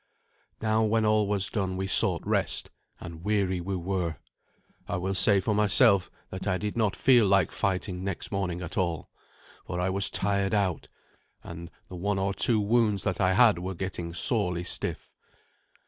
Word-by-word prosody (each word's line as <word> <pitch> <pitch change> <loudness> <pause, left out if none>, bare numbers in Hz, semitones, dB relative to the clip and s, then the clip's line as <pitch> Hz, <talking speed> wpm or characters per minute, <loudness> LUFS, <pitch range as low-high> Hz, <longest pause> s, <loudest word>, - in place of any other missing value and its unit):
Now 110 0 +1
when 110 0 +1
all 105 -1 +2
was 100 -1 +1
done 95 -3 -3
we 95 - -3
sought 95 - +4
rest, - - -1 0.3
and 85 0 -10
weary 100 -3 -1
we 95 +2 -4
were. 90 -2 -3 0.7
I - - -3
will 95 +2 -3
say 100 +1 +4
for 105 +3 -1
myself 105 -1 +3 0.2
that 95 - -6
I 95 - 0
did 105 +1 -5
not 110 -4 0
feel 120 -5 +4
like 95 -3 +2
fighting 90 -1 -3
next 100 -2 -4
morning 90 -3 -3
at 90 - -4
all, 85 -4 -3 0.6
for 90 - -4
I 90 +1 -1
was 100 0 +4
tired 100 +1 -1
out, 95 -6 -1 0.6
and 85 0 -9 0.2
the 90 - -9
one 100 +3 -2
or 95 +1 -1
two 110 +2 +3
wounds 105 -1 +1
that 95 -2 -2
I 95 0 +2
had 110 -4 +4
were 95 +1 -5
getting 85 -2 -5
sorely 90 -1 0
stiff. - - -1
95 Hz, 175 wpm, -26 LUFS, 90-105 Hz, 0.7 s, sought